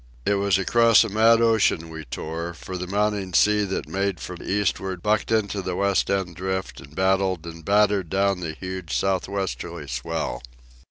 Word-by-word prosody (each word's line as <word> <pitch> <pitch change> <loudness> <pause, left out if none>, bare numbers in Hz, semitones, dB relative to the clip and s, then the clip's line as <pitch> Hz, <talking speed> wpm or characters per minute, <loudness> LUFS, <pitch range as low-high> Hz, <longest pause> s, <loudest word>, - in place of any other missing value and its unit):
It - - +3
was 100 -2 +2
across 115 +4 +5
a 110 - -3
mad 115 +2 +4
ocean 110 -8 +2
we 80 -1 -8
tore, 85 +6 -5
for 95 - -8
the 90 0 -4
mounting 100 -2 -1
sea 105 0 +4
that 95 - -3
made 100 -2 -1
from 90 -1 -7
eastward 95 -2 -1
bucked 105 +1 +1
into 105 -3 +1
the 90 -1 -3
West 100 0 +1
End 95 -4 -1
Drift 95 +1 -4
and 70 +3 -15
battled 95 -2 +1
and 85 -1 -9
battered 100 -2 +2
down 100 -1 +1
the 80 -3 -4
huge 95 -2 -4
south 95 -2 0
westerly 100 -1 -4
swell. 65 0 -3
95 Hz, 175 wpm, -24 LUFS, 85-100 Hz, -, across